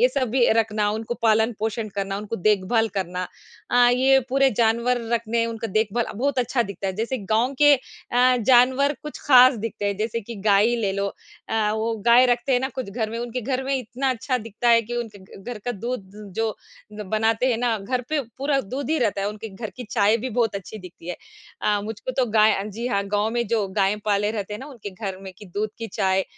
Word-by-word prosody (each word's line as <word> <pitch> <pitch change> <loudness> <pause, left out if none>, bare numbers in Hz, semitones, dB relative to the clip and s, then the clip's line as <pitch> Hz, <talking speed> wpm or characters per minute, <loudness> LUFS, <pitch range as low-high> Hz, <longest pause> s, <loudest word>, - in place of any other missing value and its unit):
ये 250 - +6
सब 255 -2 -1
भी 245 -1 +3
रखना, 210 -2 +1
उनको 220 +2 -3
पालन 220 +1 +3
पोषण 220 0 -2
करना, 195 0 -2
उनको 210 +2 -5
देखभाल 215 +3 +2
करना 180 0 -3 0.4
अ, 245 0 +5
ये 265 +2 +4
पूरे 270 +1 +3
जानवर 235 +2 +2
रखने, 230 0 0
उनका 225 0 -4
देखभाल 225 +2 0
बहुत 265 +4 -1
अच्छा 245 0 +1
दिखता 200 -2 -6
है। 190 - -1
जैसे 235 +4 -2
गाँव 245 +5 +2
के 290 -1 +8
अ, 250 0 0
जानवर 260 +4 +5
कुछ 300 - -7
खास 255 -1 +8
दिखते 205 -2 -4
हैं, 200 -1 -1
जैसे 225 +2 -2
कि 230 +3 -8 0.2
गाय 200 +2 +5
ही 240 0 +1
ले 195 -1 +1
लो 200 0 -1 0.4
अ, 215 -1 +1
वो 225 +1 -1
गाय 245 +2 +7
रखते 245 +2 +1
हैं 245 - +3
ना 265 - -1
कुछ 250 -6 -5
घर 220 0 -2
में, 230 - -4
उनके 240 +1 -4
घर 260 +2 -2
में 275 0 0
इतना 255 +2 -2
अच्छा 255 +1 -1
दिखता 230 +2 -3
है 230 0 +6
कि 240 +2 -5
उनके 225 -4 -5
घ 190 +1 -14
घर 245 -3 -5
का 245 - -1
दूध 215 -2 -5 0.3
जो 225 -1 0 0.4
ग 210 0 -6 0.3
बनाते 225 +3 0
हैं 235 - +1
ना, 240 -2 +1
घर 245 +6 -2
पे 305 -1 +1 0.2
पूरा 275 0 +1
दूध 260 +7 -5
ही 320 - +2
रहता 210 -5 0
है, 200 - -1
उनके 215 +1 -7
घर 210 +2 -7
की 250 - -6
चाय 215 0 +3
भी 250 +3 -4
बहुत 225 -2 0
अच्छी 200 +2 -7
दिखती 180 -2 -12
है। 180 - -3 0.5
अ, 205 -1 +2
मुझको 225 +4 -5
तो 255 -2 +1
गाय 215 0 +5
अ, 195 - -2
जी 220 +4 -5
हाँ, 200 -5 0
गाँव 205 +2 0
में 235 -1 0
जो 220 -4 +1
गाय 195 +1 +2
पाले 205 0 +1
रहते 210 -2 -4
हैं - - -6
ना, 270 - -8
उनके 235 -8 -8
घर 190 -1 -6
में 190 -1 -8
की 210 - -11
दूध 205 +4 -3
की 225 - -4
चाय 190 0 +2
225 Hz, 230 wpm, -23 LUFS, 210-250 Hz, 0.5 s, के